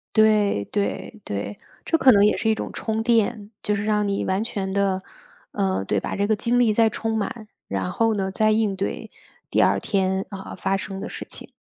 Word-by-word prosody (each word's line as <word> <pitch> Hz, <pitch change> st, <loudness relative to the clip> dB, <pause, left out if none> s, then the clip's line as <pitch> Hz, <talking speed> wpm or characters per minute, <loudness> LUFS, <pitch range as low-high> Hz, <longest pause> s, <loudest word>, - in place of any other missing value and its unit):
对 210 Hz, -, +4 dB
对 210 Hz, -, -3 dB
对， 100 Hz, 0 st, -4 dB, 0.3 s
这 325 Hz, -, +2 dB
可 265 Hz, -4 st, +7 dB
能 205 Hz, -2 st, +6 dB
也 210 Hz, -, +4 dB
是 220 Hz, -, 0 dB
一 220 Hz, -, +3 dB
种 -, -, -5 dB
充 220 Hz, 0 st, -2 dB
电， 225 Hz, -2 st, +1 dB
就 210 Hz, -, +1 dB
是 205 Hz, +1 st, -2 dB
让 210 Hz, -1 st, +1 dB
你 200 Hz, 0 st, -1 dB
完 190 Hz, +3 st, 0 dB
全 195 Hz, -4 st, -3 dB
的 195 Hz, -1 st, +1 dB, 0.5 s
呃， 95 Hz, 0 st, 0 dB
对， 100 Hz, -, +1 dB
把 -, -, -3 dB
这 200 Hz, +1 st, +1 dB
个 215 Hz, -, +3 dB
精 235 Hz, +3 st, +1 dB
力 230 Hz, -3 st, +4 dB
再 225 Hz, +1 st, +4 dB
充 225 Hz, +1 st, -2 dB
满。 215 Hz, +1 st, -4 dB, 0.2 s
然 95 Hz, -2 st, -2 dB
后 225 Hz, -1 st, +2 dB
呢， 190 Hz, -2 st, -1 dB
再 215 Hz, +3 st, +2 dB
应 215 Hz, -2 st, +1 dB
对 190 Hz, -, -4 dB, 0.4 s
第 -, -, +3 dB
2 -, -, +4 dB
天， 190 Hz, -1 st, 0 dB
呃， 195 Hz, -1 st, -7 dB
发 195 Hz, -, 0 dB
生 195 Hz, 0 st, -5 dB
的 -, -, -5 dB
事 -, -, -7 dB
情。 -, -, -10 dB
205 Hz, 220 characters per minute, -23 LUFS, 190-220 Hz, 0.5 s, 可